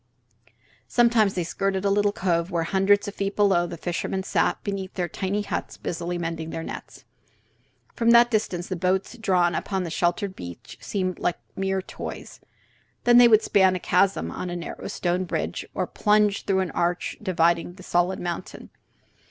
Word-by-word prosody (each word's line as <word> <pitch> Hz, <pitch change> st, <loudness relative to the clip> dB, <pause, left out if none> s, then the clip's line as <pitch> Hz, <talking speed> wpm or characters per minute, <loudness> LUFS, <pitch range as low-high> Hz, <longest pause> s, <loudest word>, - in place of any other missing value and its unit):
Sometimes 235 Hz, -4 st, +3 dB
they 180 Hz, -, 0 dB
skirted 195 Hz, +3 st, -2 dB
a 200 Hz, -, +3 dB
little 205 Hz, 0 st, +3 dB
cove 170 Hz, -3 st, 0 dB
where, 170 Hz, -3 st, 0 dB
hundreds 195 Hz, +4 st, +2 dB
of 200 Hz, -, -5 dB
feet 200 Hz, 0 st, -3 dB
below, 190 Hz, -4 st, +3 dB
the 170 Hz, -, -7 dB
fishermen 180 Hz, +3 st, -3 dB
sat -, -, +1 dB
before 195 Hz, -2 st, -3 dB
their 180 Hz, -2 st, -1 dB
tiny 200 Hz, +3 st, -2 dB
huts -, -, -4 dB
busily 175 Hz, +1 st, -3 dB
mending 165 Hz, -1 st, -4 dB
their 165 Hz, -, -5 dB
nets. -, -, -9 dB, 0.9 s
From 230 Hz, 0 st, +1 dB
that 235 Hz, +1 st, +7 dB
distance 185 Hz, -5 st, -1 dB
the 185 Hz, -, -3 dB
boats 185 Hz, +5 st, 0 dB
drawn 180 Hz, -6 st, +2 dB
upon 190 Hz, +3 st, -2 dB
the 170 Hz, -, -5 dB
sheltered 175 Hz, +3 st, 0 dB
beach 85 Hz, -1 st, -10 dB
seemed 185 Hz, -2 st, -2 dB
like 175 Hz, -, 0 dB, 0.2 s
mere 190 Hz, 0 st, -1 dB
toys. -, -, -8 dB, 0.6 s
Then 240 Hz, 0 st, +7 dB
they 245 Hz, -, +9 dB
would 220 Hz, -1 st, +5 dB
span 190 Hz, -3 st, +4 dB
a -, -, -2 dB
chasm 190 Hz, +3 st, +1 dB
on 180 Hz, -, -5 dB
a 175 Hz, -, -4 dB
narrow 170 Hz, -1 st, -6 dB
stone 180 Hz, +1 st, -1 dB
bridge, -, -, -3 dB
or -, -, 0 dB
plunge 210 Hz, -1 st, +2 dB
through 190 Hz, -1 st, +2 dB
an 185 Hz, -, -2 dB
arch 175 Hz, +1 st, -1 dB
dividing 170 Hz, -3 st, +1 dB
the 185 Hz, -, -13 dB
solid 175 Hz, +1 st, +1 dB
mountain. 175 Hz, +1 st, -6 dB
190 Hz, 175 wpm, -25 LUFS, 175-200 Hz, 0.9 s, they